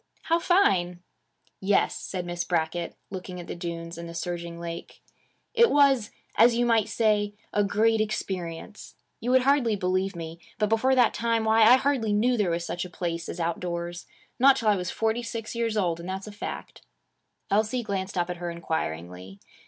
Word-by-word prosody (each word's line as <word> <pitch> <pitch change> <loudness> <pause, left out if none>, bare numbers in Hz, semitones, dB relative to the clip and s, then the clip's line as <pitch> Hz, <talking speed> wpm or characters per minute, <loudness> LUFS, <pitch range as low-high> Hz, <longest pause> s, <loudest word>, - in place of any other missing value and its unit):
'How 335 +1 +2
fine!' 180 - +2 0.6
'Yes,' 195 +1 +2
said 180 -2 -5
Miss 175 0 -3
Brackett, 170 0 -1 0.2
looking 185 -1 -6
at 175 - -7
the - - -5
dunes 170 -1 -6
and 170 0 -7
the 170 - -9
surging 170 -1 -4
lake. 170 0 -7 0.5
'It 470 -1 +5
was, 275 -6 +4 0.3
as 230 +2 +6
you 240 +1 +2
might 225 -3 +2
say, 210 -2 +1 0.2
a 205 - +3
great 220 +2 +2
experience. 190 -3 -5 0.2
You 250 +3 +3
hardly 260 -3 +3
would 205 - -3
believe 185 +1 0
me, 165 0 -7 0.2
but 210 -1 +1
before 255 +4 +3
that 245 -3 +4
time, 230 -1 0
why, 220 +1 +4
I 225 +3 +9
hardly 260 -5 +1
knew 240 +4 +3
there 205 -6 +1
was 170 0 -1
such 175 - -3
a 180 - -7
place 170 -1 -4
as 180 - -6
outdoors; 170 +1 -3 0.3
not 270 +2 +7
till 230 -5 +1
I 210 - +4
was 180 -2 -3
forty 225 +1 0
six 230 -2 -5
years 230 -2 -1
old; 175 -5 0
and 170 +2 -7
that's 190 +1 -4
a 210 - -8
fact.' 205 - -7 0.7
Elsie 215 +4 +1
glanced 195 -2 -3
up 175 0 0
at 175 - -5
her 175 0 -4
inquiringly. 95 - -4
195 Hz, 185 wpm, -26 LUFS, 170-225 Hz, 0.7 s, I